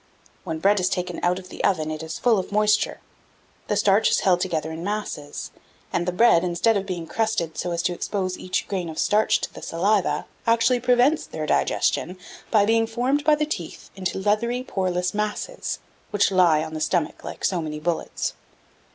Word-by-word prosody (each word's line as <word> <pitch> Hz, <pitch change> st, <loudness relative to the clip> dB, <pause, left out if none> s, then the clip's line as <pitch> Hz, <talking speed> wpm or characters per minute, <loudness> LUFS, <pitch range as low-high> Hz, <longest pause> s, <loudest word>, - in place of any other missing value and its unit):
When 160 Hz, -, -3 dB
bread 200 Hz, +5 st, +3 dB
is 180 Hz, 0 st, +1 dB
taken 180 Hz, 0 st, -3 dB
out 180 Hz, +1 st, +2 dB
of 185 Hz, -1 st, -10 dB
the -, -, -7 dB
oven, 155 Hz, -5 st, +1 dB
it 155 Hz, 0 st, -5 dB
is 160 Hz, 0 st, -5 dB
full 230 Hz, -4 st, +3 dB
of 185 Hz, -, -5 dB
moisture; 210 Hz, 0 st, +2 dB, 0.7 s
the -, -, 0 dB
starch 205 Hz, +2 st, +4 dB
is -, -, +2 dB
held 180 Hz, -2 st, +3 dB
together 160 Hz, -4 st, -1 dB
in 160 Hz, +1 st, -6 dB
masses, 200 Hz, -8 st, -4 dB, 0.4 s
and 175 Hz, -, 0 dB
the -, -, +2 dB
bread, 180 Hz, -2 st, +5 dB
instead 180 Hz, +6 st, +2 dB
of 195 Hz, -1 st, -1 dB
being 175 Hz, -3 st, -4 dB
crusted 220 Hz, -4 st, -1 dB
so 180 Hz, -, -3 dB
as 170 Hz, 0 st, -1 dB
to 180 Hz, -, +1 dB
expose 185 Hz, 0 st, -2 dB
each 185 Hz, -, -2 dB
grain 185 Hz, -4 st, -3 dB
of 160 Hz, -, -8 dB
starch 215 Hz, +1 st, +3 dB
to -, -, -4 dB
the -, -, -10 dB
saliva, 195 Hz, +3 st, +1 dB, 0.2 s
actually 230 Hz, +2 st, +3 dB
prevents 250 Hz, +5 st, +3 dB
their 155 Hz, -, -4 dB
digestion 180 Hz, +3 st, +1 dB, 0.3 s
by 210 Hz, -3 st, +4 dB
being 225 Hz, +1 st, +3 dB
formed 250 Hz, +6 st, 0 dB
by 305 Hz, 0 st, +5 dB
the 300 Hz, 0 st, 0 dB
teeth 175 Hz, -, -6 dB
into 190 Hz, -1 st, -3 dB
leathery 220 Hz, +5 st, 0 dB
poreless 180 Hz, -5 st, -1 dB
masses, 210 Hz, -, -3 dB, 0.3 s
which 205 Hz, -1 st, +2 dB
lie 170 Hz, -5 st, +4 dB
on 160 Hz, 0 st, -7 dB
the 155 Hz, -, -4 dB
stomach 170 Hz, -1 st, -1 dB
like -, -, -5 dB
so 180 Hz, -3 st, +1 dB
many 150 Hz, -1 st, -5 dB
bullets. 165 Hz, +2 st, -2 dB
190 Hz, 195 wpm, -24 LUFS, 170-215 Hz, 0.7 s, bread